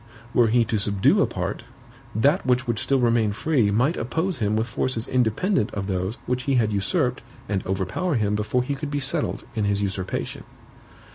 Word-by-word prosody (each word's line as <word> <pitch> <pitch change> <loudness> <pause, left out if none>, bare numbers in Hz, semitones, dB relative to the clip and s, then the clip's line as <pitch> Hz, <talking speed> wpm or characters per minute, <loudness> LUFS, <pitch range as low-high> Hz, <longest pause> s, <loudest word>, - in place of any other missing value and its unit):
Were 120 -2 +5
he 115 +1 +3
to 110 -1 -1
subdue 100 -1 +3
a - - +3
part, - - -3 0.5
that 140 - +3
which 125 0 +1
would 120 -3 -1
still 135 - +2
remain 115 -3 +2
free 120 -2 +1
might 125 - +2
oppose 165 +10 -1
him 105 -1 +1
with 110 +1 +1
forces 115 0 -1
independent 125 - +1
of 100 -1 -2
those 95 +2 -2
which 125 0 -2
he 140 - +2
had 110 -4 +2
usurped 125 - 0 0.3
and 100 -3 -1
overpower 95 - -1
him 105 -3 +1
before 105 +4 0
he 140 - -2
could 140 +1 -4
be 145 0 -1
settled 145 +3 -2
in 110 -2 -1
his 100 0 +1
usurpation." 95 -1 -3
115 Hz, 190 wpm, -24 LUFS, 105-135 Hz, 0.5 s, Were